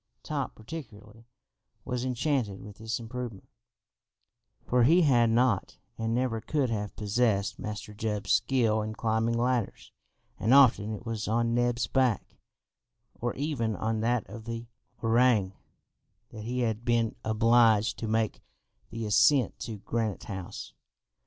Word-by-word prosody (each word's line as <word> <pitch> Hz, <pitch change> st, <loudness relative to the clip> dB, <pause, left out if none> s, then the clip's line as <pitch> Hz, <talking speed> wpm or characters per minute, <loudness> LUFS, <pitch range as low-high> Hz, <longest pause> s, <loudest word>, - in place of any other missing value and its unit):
Top 140 Hz, -5 st, -3 dB
particularly 110 Hz, -4 st, -10 dB, 0.6 s
was 125 Hz, -1 st, -2 dB
enchanted 125 Hz, -5 st, -1 dB
with 105 Hz, +1 st, -12 dB
this 110 Hz, +1 st, -3 dB
improvement, 115 Hz, -3 st, -7 dB, 1.2 s
for 125 Hz, 0 st, +2 dB
he 165 Hz, +9 st, +5 dB
had 120 Hz, -6 st, +4 dB
not, 115 Hz, -3 st, +1 dB, 0.2 s
and 115 Hz, 0 st, -1 dB
never 120 Hz, -3 st, 0 dB
could 140 Hz, -1 st, 0 dB
have 105 Hz, -2 st, -3 dB
possessed 105 Hz, -1 st, 0 dB
Master 105 Hz, 0 st, -6 dB
Jup's 105 Hz, -2 st, -3 dB
skill 115 Hz, -5 st, +2 dB
in 110 Hz, 0 st, -4 dB
climbing 115 Hz, +1 st, 0 dB
ladders, 120 Hz, -2 st, -1 dB, 0.5 s
and 120 Hz, +5 st, +4 dB
often 115 Hz, -6 st, +5 dB
it 110 Hz, +2 st, -6 dB
was 115 Hz, -2 st, -3 dB
on 115 Hz, +1 st, +1 dB
Neb's 120 Hz, 0 st, +1 dB
back, 130 Hz, -5 st, 0 dB, 0.8 s
or 120 Hz, 0 st, -3 dB
even 130 Hz, -7 st, -1 dB
on 110 Hz, +1 st, -1 dB
that 120 Hz, 0 st, 0 dB
of 110 Hz, +3 st, -10 dB
the 115 Hz, 0 st, -5 dB, 0.4 s
orang, 115 Hz, -4 st, +3 dB, 0.8 s
that 110 Hz, -1 st, -8 dB
he 125 Hz, +2 st, -2 dB
had 110 Hz, -1 st, -1 dB
been 120 Hz, -2 st, +1 dB
obliged 110 Hz, 0 st, +3 dB
to 115 Hz, -, -3 dB
make 110 Hz, 0 st, 0 dB, 0.5 s
the 115 Hz, -1 st, -5 dB
ascent 130 Hz, +6 st, +3 dB
to 110 Hz, -2 st, -5 dB
Granite 110 Hz, 0 st, -3 dB
House. 95 Hz, -, -7 dB
115 Hz, 135 wpm, -28 LUFS, 110-125 Hz, 1.2 s, he